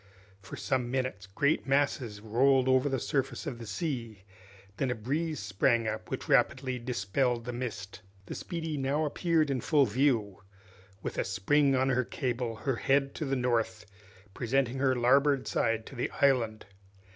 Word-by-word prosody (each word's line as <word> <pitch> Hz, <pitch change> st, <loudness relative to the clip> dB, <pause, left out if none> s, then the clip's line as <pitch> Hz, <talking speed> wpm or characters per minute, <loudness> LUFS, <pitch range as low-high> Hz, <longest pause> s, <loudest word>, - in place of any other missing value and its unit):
For 95 Hz, -, -9 dB
some 120 Hz, +5 st, -1 dB
minutes 130 Hz, -7 st, -2 dB
great 140 Hz, +12 st, 0 dB
masses 135 Hz, -6 st, 0 dB
rolled 130 Hz, +4 st, +3 dB
over 130 Hz, +2 st, +3 dB
the 135 Hz, -, 0 dB
surface 135 Hz, -2 st, -2 dB
of 120 Hz, -, -5 dB
the 115 Hz, -, -8 dB
sea, 115 Hz, -, -4 dB, 0.5 s
then 135 Hz, -, 0 dB
a 125 Hz, -, 0 dB
breeze 150 Hz, +8 st, -2 dB
sprang 115 Hz, +4 st, +1 dB
up, 110 Hz, 0 st, -4 dB
which -, -, -4 dB
rapidly 130 Hz, -1 st, +2 dB
dispelled 120 Hz, +1 st, -1 dB
the 125 Hz, -, -4 dB
mist. 110 Hz, -6 st, -6 dB, 0.2 s
The -, -, -6 dB
"Speedy" 165 Hz, -3 st, -4 dB
now 140 Hz, +3 st, 0 dB
appeared 155 Hz, -1 st, +1 dB
in 130 Hz, -3 st, -1 dB
full 145 Hz, 0 st, +3 dB
view, 120 Hz, -8 st, +1 dB, 0.6 s
with -, -, -4 dB
a -, -, +2 dB
spring 135 Hz, +10 st, +2 dB
on 130 Hz, +1 st, +2 dB
her 130 Hz, -1 st, +2 dB
cable, 120 Hz, -2 st, -3 dB
her 120 Hz, +3 st, -2 dB
head 135 Hz, +1 st, +1 dB
to 155 Hz, -, -4 dB
the 135 Hz, 0 st, 0 dB
north, 120 Hz, -4 st, 0 dB, 0.5 s
presenting 130 Hz, +3 st, 0 dB
her 130 Hz, -1 st, +2 dB
larboard 135 Hz, +3 st, +3 dB
side 115 Hz, 0 st, 0 dB
to 135 Hz, -, -11 dB
the 120 Hz, -, -2 dB
island. 120 Hz, -6 st, +2 dB
130 Hz, 165 wpm, -30 LUFS, 115-140 Hz, 0.6 s, rolled